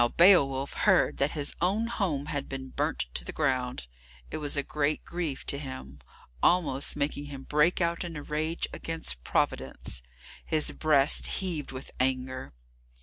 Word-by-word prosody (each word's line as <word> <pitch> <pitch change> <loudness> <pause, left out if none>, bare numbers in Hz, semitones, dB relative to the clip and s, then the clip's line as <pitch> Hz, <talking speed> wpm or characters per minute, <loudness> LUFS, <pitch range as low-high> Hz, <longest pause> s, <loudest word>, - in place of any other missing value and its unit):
Now 120 - +5
Beowulf 140 -5 +5
heard 190 -4 +3
that 140 - +2
his 145 -1 +1
own 200 +6 +2
home 185 -12 -1
had 145 -2 -3
been 130 -1 -5
burnt - - -1
to - - +1
the - - -5
ground. 130 - 0 0.5
It - - -3
was 150 -1 -2
a 140 - +1
great 150 +1 -1
grief 170 -6 -3
to 140 - -1
him, 130 - -8 0.4
almost 155 -6 +3
making 145 0 -1
him 140 -2 -8
break 150 +6 +2
out 170 +2 +1
in 170 -2 -6
a 150 - -5
rage 155 +3 -1
against 160 - -4
Providence. 65 -2 -1 0.4
His 155 -1 +2
breast 150 -3 +3
heaved 170 -7 -3
with 130 0 -8
anger. 130 - -1
145 Hz, 160 wpm, -29 LUFS, 130-165 Hz, 0.5 s, Now